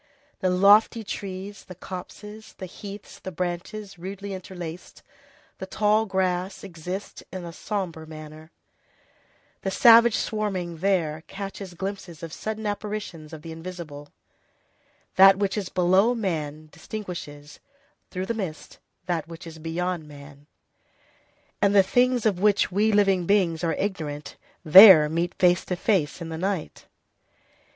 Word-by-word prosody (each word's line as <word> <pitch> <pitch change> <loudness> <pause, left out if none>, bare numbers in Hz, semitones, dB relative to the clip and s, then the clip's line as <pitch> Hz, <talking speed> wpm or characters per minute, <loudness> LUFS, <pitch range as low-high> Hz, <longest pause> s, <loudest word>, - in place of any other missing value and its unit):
The 185 - +1
lofty 205 +5 +5
trees, 195 0 -7
the 185 - -10
copses, 210 +4 -9
the 185 - -6
heaths, 200 +2 -10
the 190 - -7
branches 180 +3 -5
rudely 195 +2 -6
interlaced, 180 -2 -8 0.6
the - - -6
tall 215 +1 +2
grass, 190 0 -1
exist 185 +2 -7
in 185 -2 -6
a 170 - -8
sombre 170 -5 -4
manner; 155 0 -11 1.1
the 195 - -2
savage 230 +3 +7
swarming 190 -6 -2
there 165 -4 0
catches 195 -2 -7
glimpses 190 -3 -6
of 165 -1 -7
sudden 220 0 -5
apparitions 205 -6 -5
of 155 -2 -10
the 165 - -8
invisible; 160 -4 -8 1.1
that 195 0 +8
which 200 -1 -1
is 200 -4 -3
below 185 +7 +3
man 155 -7 -3
distinguishes, 150 -8 -8 0.5
through 185 +1 -4
the 230 - -2
mists, 190 -8 -6 0.3
that 170 -3 -2
which 165 0 -10
is 165 -1 -10
beyond 165 0 -3
man; 145 0 -14 1.1
and 200 0 +3
the 195 - +7
things 245 +4 +2
of 200 -5 +2
which 205 -1 +3
we 210 +4 +2
living 195 -4 +2
beings 180 -6 +2
are 165 -2 0
ignorant 155 -7 -4 0.3
there 180 -1 +10
meet 170 +3 -2
face 180 -1 +3
to 180 - -3
face 175 -4 0
in 165 - -5
the 160 0 -5
night. 190 -2 -3
185 Hz, 135 wpm, -25 LUFS, 165-200 Hz, 1.1 s, there